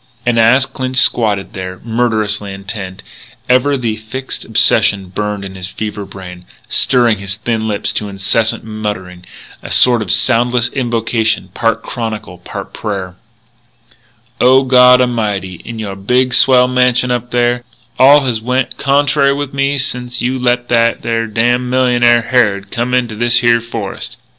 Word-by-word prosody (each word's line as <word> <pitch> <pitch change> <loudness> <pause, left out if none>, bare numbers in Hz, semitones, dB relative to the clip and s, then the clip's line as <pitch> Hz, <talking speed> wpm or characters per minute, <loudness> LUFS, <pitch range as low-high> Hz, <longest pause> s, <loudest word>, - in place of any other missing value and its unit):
And, 120 -1 +2
as 125 +4 +4
Clinch 130 -1 -5
squatted 105 -6 +1
there, 95 -1 -7
murderously 110 -3 -1
intent, 95 0 -7 0.4
ever 130 +3 +2
the 115 -4 -2
fixed 125 +5 -6
obsession 95 -2 +2
burned 105 +1 -4
in 95 - -8
his 95 -1 -6
fever 105 +1 -6
brain, 90 -2 -11 0.2
stirring 120 -5 +2
his 100 0 -4
thin 110 0 -2
lips 105 -2 -2
to 105 - -3
incessant 100 +3 -1
muttering, 105 -5 -6 0.4
a - - -9
sort 120 -2 +4
of 105 - -5
soundless 120 +3 +2
invocation, 115 -5 -1
part 115 +4 -1
chronicle, 110 -6 -6
part 90 - -8
prayer: 95 -4 -5 1.2
"O 130 +2 +5
God 125 -1 +6
A'mighty, 105 -7 -2
in 115 - -8
your 105 -3 -5
big, 125 +6 0
swell 125 -1 +5
mansion 125 0 +1
up 120 0 -2
there, 120 0 0 0.4
all 140 +3 +7
has 120 -5 -2
went 125 +2 -2
contrary 140 0 +2
with 140 -1 -4
me 140 +1 0
sence 125 -2 -3
you 130 +2 -1
let 120 -1 0
that 115 -1 +1
there 115 0 -1
damn 120 +3 0
millionaire, 120 -2 +3
Harrod, 100 -6 0
come 120 +2 -1
into 120 -3 -1
this 120 +2 +2
here 120 -1 +3
forest.... 115 -4 -6
115 Hz, 150 wpm, -14 LUFS, 105-125 Hz, 1.2 s, all